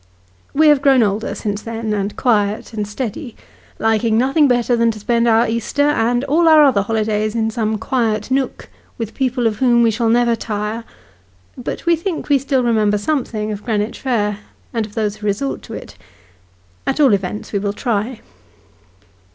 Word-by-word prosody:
We 310 +1 +4
have 295 -2 +4
grown 270 -3 +5
older 210 +2 -1
since 205 -1 -3
then, 225 -1 -4
and 200 0 -2
quiet, 215 -2 0
and 210 -2 -3
steady: 235 +2 -5 0.4
liking 220 0 +1
nothing 270 +5 +3
better 245 -1 +2
than 230 0 +2
to 215 -1 -4
spend 235 +2 +1
our 230 +1 +4
Easter, 230 +5 -1
and 245 -2 +1
all 315 +5 +2
our 310 -1 +7
other 255 -8 +4
holidays, 215 0 -1
in 225 -1 0
some 220 -1 -1
quiet 225 -1 -1
nook, 265 0 -1 0.3
with 225 -2 -5
people 255 -2 -1
of 215 -2 0
whom 240 -2 +4
we 230 - +4
shall 225 +1 0
never 235 0 +3
tire; 215 +1 -4 0.7
but 250 - -6
we 340 0 +4
think 330 0 -4
we 285 -1 +4
still 265 -1 0
remember 215 -3 +2
something 215 -3 -2
of 210 -1 -6
Greenwich 215 -2 -2
Fair, 210 -6 -1 0.3
and 225 -2 -1
of 210 - -18
those 215 -2 -1
who 210 - -5
resort 210 +8 -2
to - - -9
it. - - -10 0.9
At 270 - 0
all 275 -7 +5
events 195 +2 -3
wo 200 - +1
will 200 0 -1
try. 230 +1 -2
230 Hz, 180 wpm, -18 LUFS, 210-255 Hz, 0.9 s, our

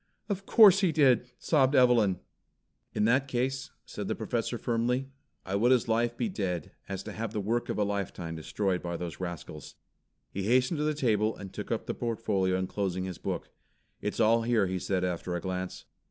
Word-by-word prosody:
"Of 195 -1 -3
course 205 -4 +8
he 190 -4 +3
did!" 130 -5 +3
sobbed 140 -3 +2
Evelyn. 115 -7 +5 0.8
"In 105 - +2
that 130 +4 +2
ease," 130 +2 -1 0.2
said - - -6
the - - -1
Professor - - -2
firmly, 125 +3 0 0.4
"I 95 - -4
would 115 +5 +3
as 125 -3 +3
lief 115 +1 +1
be - - 0
dead 95 - -3 0.2
as 95 -1 -4
to 110 - -7
have 110 +1 -4
the 105 - -1
work 115 +4 -1
of - - -2
a 105 - +2
lifetime 100 -5 -3
destroyed 90 +3 -1
by 85 -1 -4
those 85 -2 -6
rascals." 85 -4 -7 0.6
He 100 - -4
hastened 125 - +2
to - - +1
the 155 0 0
table 110 -6 +1
and 95 -2 -9
took - - -6
up - - -1
the - - -2
portfolio 105 -5 0
enclosing 95 0 -2
his 95 -2 -6
book. - - -4 0.5
"It's 105 - -3
all 115 +1 +4
here," 115 -3 +2
he 95 0 -2
said 95 0 -1
after 90 0 -2
a - - -1
glance. 95 0 -4
110 Hz, 195 wpm, -29 LUFS, 95-125 Hz, 0.8 s, course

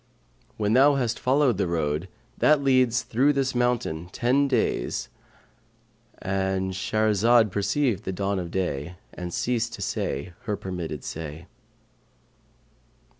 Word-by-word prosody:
[FN#541] - - -37
When 105 0 +1
thou 140 +3 +6
hast 120 -4 -1
followed 130 -3 +2
the 95 - +1
road, 80 0 -1 0.3
that 150 -2 +4
leads 130 -2 +3
through 135 +6 +2
this 135 -1 0
mountain, 120 -10 -1
ten 130 +7 +2
days,' 125 -5 -1 1.1
"—And 95 0 -1
Shahrazad 110 +3 +3
perceived 110 +2 0
the 95 - -2
dawn 100 +1 -1
of 85 -2 -5
day 90 -2 -3 0.2
and 90 -1 -6
ceased 115 +3 -1
to - - -10
say 70 +6 -3
her 105 -3 -1
permitted 85 -7 -5
say. 80 +1 -7
105 Hz, 125 wpm, -25 LUFS, 90-125 Hz, 1.1 s, thou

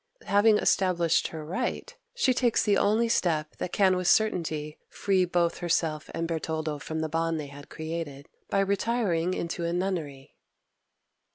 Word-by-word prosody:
Having 210 +2 +4
established 175 -6 +2
her 155 -2 -7
right, 240 +11 -3 0.2
she 270 - +3
takes 240 -2 +2
the 205 - +3
only 215 +4 +2
step 155 -8 0
that 180 - -4
can 190 -2 +3
with 180 -1 -1
certainty 160 -8 +1
free 190 -2 +1
both 175 -1 0
herself 165 -3 -1
and 165 0 -2
Bertoldo 160 -2 -3
from 160 +1 -4
the 160 - -1
bond 165 +1 -1
they 150 - -4
had 145 0 -12
created, 160 -3 -6 0.2
by 195 - +2
retiring 195 -4 0
into 170 0 -3
a 170 - -1
nunnery. 170 -7 -3
170 Hz, 155 wpm, -27 LUFS, 160-195 Hz, 0.2 s, Having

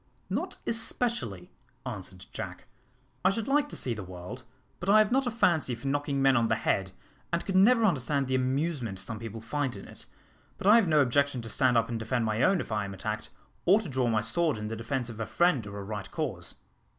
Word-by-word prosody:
"Not - - -2
especially," 225 - -1 0.3
answered - - -7
Jack: - - -6 0.6
"I - - +6
should 220 +2 -2
like 290 +1 +2
to - - -7
see 125 - -2
the 110 - -6
world, 90 +7 -8 0.4
but 180 - -3
I 210 - +7
have 215 0 +4
not 265 0 +2
a - - +3
fancy 170 - +2
for 120 +4 -7
knocking 140 0 0
men 135 -1 +5
on 115 -2 +3
the 110 - +2
head, 95 -3 0 0.4
and 170 0 -1
could 190 - -2
never 225 +4 +6
understand 140 - +1
the 130 - -2
amusement 130 - 0
some 110 +3 -4
people 115 -1 -7
find 130 +2 -2
in 100 - -9
it; - - -11 0.5
but - - -8
I 210 +3 +8
have 225 -5 +3
no 155 -2 +5
objection 140 -1 +1
to 115 - -6
stand 125 +1 +3
up 115 0 +2
and 115 -1 -3
defend 115 +1 -1
my 110 +1 0
own 185 +3 +4
if - - -8
I 105 -1 0
am 100 0 -6
attacked, 105 +3 -4 0.4
or 195 +5 +6
to 205 -7 -6
draw 130 -2 0
my 110 -2 +2
sword 145 +5 +1
in 105 0 -4
the 115 - -3
defence 120 +3 -2
of 115 -2 -8
a 115 - -3
friend 165 -11 +2
or 100 0 -7
a 100 - -5
right 105 -1 -5
cause." - - -3
130 Hz, 230 wpm, -29 LUFS, 110-170 Hz, 0.6 s, I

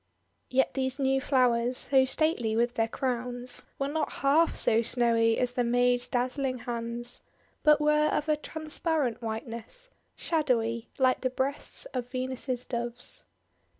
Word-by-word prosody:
Yet 265 +1 +2
these 260 0 -1
new 270 -1 +1
flowers, 250 -2 +2
so 265 -1 +4
stately 260 -6 +1
with 235 +1 +1
their 225 -1 +1
crowns, 245 0 -3
were 275 - -1
not 310 +2 -2
half 305 +5 +4
so 225 +1 +4
snowy 230 -1 +2
as 250 -1 +1
the 245 0 0
maid's 245 +1 +2
dazzling 255 +1 -1
hands, 240 0 -4 0.4
but 300 -1 +5
were 300 0 +3
of 300 - 0
^a 305 -1 0
transparent 310 -5 -2
white 225 +1 -4
ness, 370 - -7
— - - -44
shadowy, 235 -8 0
like 255 -1 +3
the 255 - +1
breasts 265 - 0
of 250 -2 -3
Venus' 255 -1 -3
Doves. 240 -1 -4
255 Hz, 150 wpm, -28 LUFS, 235-275 Hz, 0.4 s, but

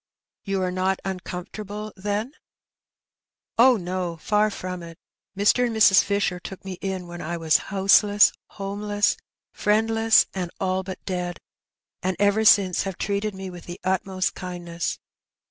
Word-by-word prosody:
" - - -68
You 190 -1 0
are 180 - -1
not 185 +1 0
uncomfortable, 200 +3 -6
then? 205 +5 -2 0.4
" - - -68
" - - -60
Oh, 250 0 +7
no! 180 -2 -3
far 210 +5 +2
from 185 -3 -6
it. 165 -1 -10 0.4
Mr. 225 +5 +3
and 230 - -4
Mrs. 200 -3 +7
Fisher 200 -3 0
took 190 +2 -9
me 185 -2 -6
in 190 -2 -3
when 175 0 -8
I 170 +2 -3
was 160 -2 +3
houseless, 200 +1 +5
homeless, 205 +1 -1 0.4
friendless, 225 +1 +3
and 180 -3 -3
all 185 0 0
but 190 0 -8
dead, 180 -2 -3 0.6
and 185 0 -1
ever 205 +2 +3
since 195 -4 +5
have 195 -2 -4
treated 200 0 -2
me 190 -1 -6
with 175 -1 -11
the 175 0 -8
utmost 185 0 -1
kindness. 175 -2 -4
190 Hz, 155 wpm, -24 LUFS, 180-205 Hz, 0.6 s, Oh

